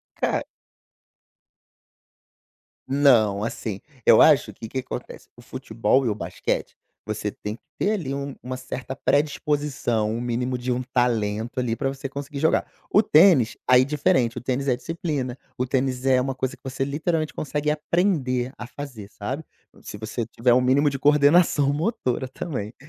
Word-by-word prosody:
Ca - - 0 2.5
Não. 120 -8 +4
Assim, 110 -2 -4 0.3
eu - - +7
acho, - - +5
que 110 - -8
que 130 - -3
acontece, 125 -1 -7
o 120 - -15
futebol 130 +1 0
e - - +2
o 105 - -1
basquete, 105 - -3 0.3
você 105 0 -3
tem 105 +2 -6
que - - -22 0.2
ter 205 - +2
ali 160 -10 -3
um 140 0 -4
uma 130 +1 -4
certa 130 +1 -6
predisposição, 145 -6 0
um 115 - -3
mínimo 125 +1 -1
de 125 +1 -3
um 125 +1 -1
talento 115 -1 0
ali 120 -2 0
pra 135 +2 -2
você 135 0 -5
conseguir 140 +1 -7
jogar. 160 +2 +2 0.2
O 205 - +6
tênis, 155 - +5
aí, 125 0 +7
é 130 - +2
diferente. 130 -5 +1
O - - -4
tênis 130 +2 -2
é 125 - +3
disciplina. 140 -3 -3 0.2
O 125 - 0
tênis 130 0 -1
é 130 -1 +4
uma 135 0 -2
coisa 130 0 -3
que - - -30
você 135 0 -3
literalmente 155 +3 -1
consegue 150 0 -1
aprender 150 -6 0
a 120 - -7
fazer, 125 -7 -8
sabe. 130 +10 -5 0.4
Se - - -8
você 110 +2 -4
tiver 120 +1 +2
o 125 - +4
mínimo 135 +4 +3
de 135 -1 -5
coordenação 145 0 +4
motora 150 - -1
também, 125 -5 -5
130 Hz, 165 wpm, -24 LUFS, 120-145 Hz, 2.5 s, eu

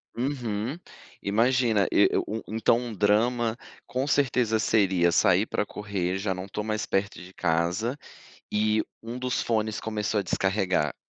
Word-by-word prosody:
Uhum. 120 0 -2 0.5
Imagina 115 0 +2
e - - +5
u 110 +1 -2
u - - -10
então 115 +1 +3
um 120 -1 -5
drama 110 +3 +2 0.3
com 130 +2 -1
certeza 125 -6 +2
seria 95 -6 +3
sair 95 +3 +4
pra 105 - -1
correr, 95 -3 -3
já 95 0 -1
não 90 +1 -6
tô 105 +1 -3
mais 110 0 -1
perto 95 0 -1
de 90 +1 -12
casa 90 - 0 0.5
e 110 +1 +2 0.2
um 115 +2 -6
dos 125 -1 -1
fones 110 -2 -1
começou 105 -1 -1
a - - -2
descarregar. 95 -6 0
110 Hz, 150 wpm, -26 LUFS, 95-115 Hz, 0.5 s, e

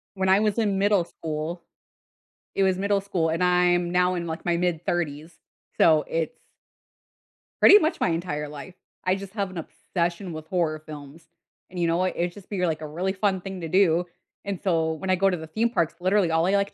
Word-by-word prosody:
When 190 -1 0
I 190 +2 +6
was 215 +1 +1
in 205 -4 +1
middle 200 -2 +3
school 160 +1 -5 0.9
it 195 - +3
was 190 -1 +2
middle 200 +1 +1
school, 185 -5 -1
and 165 +3 0
I'm 180 -1 +3
now 180 0 +2
in, 170 0 -3
like, 160 0 -5
my 170 -1 +1
mid 175 -1 -1
30s, 160 -1 -3 0.4
so, 155 -2 +5
it's 165 -1 -2 1.3
pretty 410 - +9
much 315 -2 0
my - - +2
entire 150 -3 -3
life. 150 +5 -9 0.3
I 185 - +3
just 195 0 -8
have 200 -3 -2
an 185 - -9
obsession 170 +2 -3
with 155 0 -8
horror 165 -4 0
films, 150 +2 -11 0.4
and 180 - -7
you 170 - +2
know 165 - +1
what, 185 +1 0
it 175 0 -1
just 200 -1 -14
be, 185 -3 -1
like, 160 -2 -1
a 155 - -5
really 180 +5 -2
fun 190 -2 0
thing 190 -1 -7
to 165 - -4
do, 180 -1 +3 0.4
and 200 -3 -3
so 165 -4 +1
when 185 +4 -6
I 185 - +4
go 195 +2 +3
to 180 - -1
the 160 - -8
theme 225 +8 0
parks, 170 -8 0
literally, 185 -1 +2
all 165 +1 +2
I 195 +2 +2
like 200 0 +1
180 Hz, 215 wpm, -25 LUFS, 165-190 Hz, 1.3 s, pretty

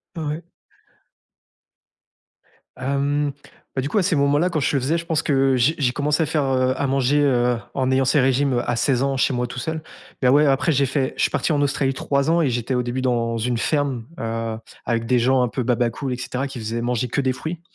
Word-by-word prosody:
O-ouais. 160 +1 -4 2.3
Hem, 140 +2 0 0.4
bah, 130 - 0
du 140 - -3
coup, - - -1
à 200 - +3
ces 175 -1 +1
moments-là 145 +5 +2
quand 155 - -1
je 145 - 0
le 135 - +1
faisais, 155 +6 +1
je 170 - -5
pense 160 -2 0
que 135 -2 +2
j'ai 125 +6 +2
j'ai 130 -4 +1
commencé 145 +3 0
à - - 0
faire, 150 -1 0
heu, 130 -1 +1
à 140 - +1
manger, 135 +2 +2
heu, 125 -3 +2 0.2
en 130 -1 0
ayant 130 0 +2
ces 140 +3 +3
régimes, 135 +1 +2
heu, 120 - -1
à 120 - +1
16 125 +1 +1
ans, 135 -1 0
chez 130 - +2
moi, 125 0 -1
tout 125 - -9
seul. 160 +5 -3 0.4
Mais, 125 - +4
ouais, 145 +3 +5
après, 140 +3 +2
j'ai 140 -1 +2
fait 135 0 -1
je - - -1
suis - - +2
parti - - 0
en 145 -2 +1
Australie 135 -1 +1
3 140 +2 0
ans 170 +1 +3
et 140 - +2
j'étais, 120 +2 -2
au 125 - +1
début, 125 +2 -3
dans 120 -2 0
une 120 +1 -1
ferme, 135 -2 -1
heu, 115 0 -3 0.3
avec 115 -1 -1
des 125 0 +2
gens 130 +2 +3
un 125 - +2
peu 125 +2 -3
baba 120 -1 +1
cool, 130 +2 -4
et - - -4
cetera, 130 +2 -3
qui 135 - -8
faisaient 115 +1 -3
manger 125 0 -1
que 140 - -1
des 130 -1 0
fruits. 160 +5 -6
135 Hz, 240 wpm, -22 LUFS, 125-145 Hz, 2.3 s, ouais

